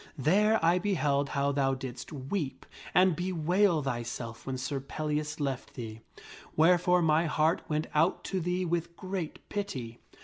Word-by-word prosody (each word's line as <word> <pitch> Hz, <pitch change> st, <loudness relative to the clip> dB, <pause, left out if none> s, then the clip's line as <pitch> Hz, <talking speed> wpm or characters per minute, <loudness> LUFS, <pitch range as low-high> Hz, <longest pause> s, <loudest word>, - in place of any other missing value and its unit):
There 205 Hz, -, +4 dB
I 175 Hz, +2 st, +4 dB
beheld 145 Hz, -8 st, +1 dB
how 140 Hz, 0 st, +1 dB
thou 135 Hz, -1 st, +1 dB
didst 130 Hz, 0 st, -7 dB
weep 145 Hz, +1 st, -4 dB, 0.3 s
and 185 Hz, -2 st, +5 dB
bewail 180 Hz, 0 st, +2 dB
thyself 120 Hz, -2 st, -4 dB
when 130 Hz, -1 st, -2 dB
Sir 130 Hz, +2 st, -2 dB
Pellias 150 Hz, +2 st, -3 dB
left 135 Hz, -3 st, -3 dB
thee, 110 Hz, -3 st, -7 dB, 0.5 s
wherefore 180 Hz, +2 st, +4 dB
my 160 Hz, +1 st, +3 dB
heart 155 Hz, +2 st, +2 dB
went 155 Hz, 0 st, 0 dB
out 160 Hz, +4 st, +2 dB
to 190 Hz, -, -2 dB
thee 180 Hz, +1 st, -1 dB
with 170 Hz, 0 st, -2 dB
great 185 Hz, -4 st, -5 dB
pity. 130 Hz, -, -4 dB
155 Hz, 145 wpm, -30 LUFS, 135-180 Hz, 0.5 s, and